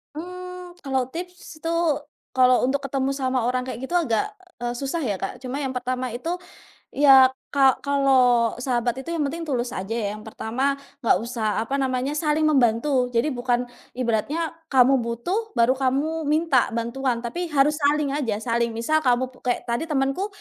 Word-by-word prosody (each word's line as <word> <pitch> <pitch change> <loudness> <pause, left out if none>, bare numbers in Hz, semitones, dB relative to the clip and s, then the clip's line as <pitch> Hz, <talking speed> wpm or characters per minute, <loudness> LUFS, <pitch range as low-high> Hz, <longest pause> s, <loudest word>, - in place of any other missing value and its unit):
Mmm, 360 +1 -8
kalau 265 -3 0
tips 355 +3 -8
itu, 330 - -1 0.6
kalau 255 -1 +5
untuk 270 +2 +1
ketemu 270 0 0
sama 260 -3 -1
orang 250 +1 -1
kayak 235 - -5
gitu 265 - -6
agak, 245 -11 +2 0.4
eee, 240 - -1
susah 275 +6 -3
ya, 205 -6 -2
Kak. - - -4
Cuma 260 +3 -4
yang 265 -2 -3
pertama 255 0 -2
itu, 325 +8 -3 0.6
ya 270 -2 +7 0.2
ka 270 -2 +4
kalau 255 -5 +3
sahabat 245 0 -1
itu 300 - -8
yang 305 - 0
penting 325 +4 -4
tulus 250 -4 -1
aja 190 +4 -4
ya, 225 -3 -1
yang 215 - -12
pertama 255 +6 -1 0.2
nggak 235 - +3
usah 225 -2 -1
apa 275 +4 -2
namanya, 260 0 0
saling 305 0 +1
membantu. 255 -2 +3
Jadi 275 +6 +2
bukan 245 0 0 0.3
ibaratnya 255 +7 -1 0.2
kamu 265 -1 +5
butuh, 350 - -3
baru 235 +2 +4
kamu 285 +4 0
minta 300 -4 +3
bantuan, 235 +1 -1
tapi 345 +9 -3
harus 300 0 +2
saling 290 0 +2
aja, 270 -7 -1
saling. 235 -1 0
Misal 310 +8 +1
kamu 255 +1 +2
pu 255 - -20
kayak 245 -1 -1
tadi 235 +8 -1
temenku, 275 +6 0
265 Hz, 170 wpm, -24 LUFS, 240-295 Hz, 0.6 s, ya